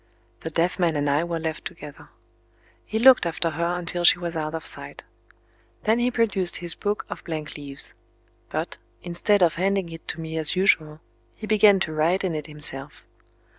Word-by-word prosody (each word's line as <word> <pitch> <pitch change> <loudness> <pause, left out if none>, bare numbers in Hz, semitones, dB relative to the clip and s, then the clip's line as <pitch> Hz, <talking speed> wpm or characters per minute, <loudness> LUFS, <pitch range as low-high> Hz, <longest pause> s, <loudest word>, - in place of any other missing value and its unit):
The 160 - -5
deaf 170 +4 0
man 170 -3 +2
and 145 0 0
I 145 +3 +2
were 170 -1 -3
left 160 -1 -4
together. - - -10 0.8
He 220 - -2
looked 250 -5 +6
after 165 0 -1
her 170 +3 -1
until 175 0 -2
she 170 - +7
was 170 -1 -5
out 155 0 -3
of 160 - -6
sight. - - 0 0.8
Then 220 +2 +2
he 245 +1 +2
produced 205 -7 +1
his 175 -1 -1
book 205 0 -3
of - - -8
blank 155 -3 -5
leaves. 140 -2 -3 0.6
But, - - -4 0.2
instead 180 +3 +1
of 165 -2 +2
handing 195 -1 0
it 165 0 -11
to 165 - -4
me 160 0 -5
as 155 +3 +2
usual, 160 -5 +2 0.4
he 220 - -7
began 210 -2 +5
to 160 - -1
write 165 +5 +1
in 185 -3 -1
it 155 0 -4
himself. 145 -2 -2
170 Hz, 185 wpm, -24 LUFS, 155-190 Hz, 0.8 s, she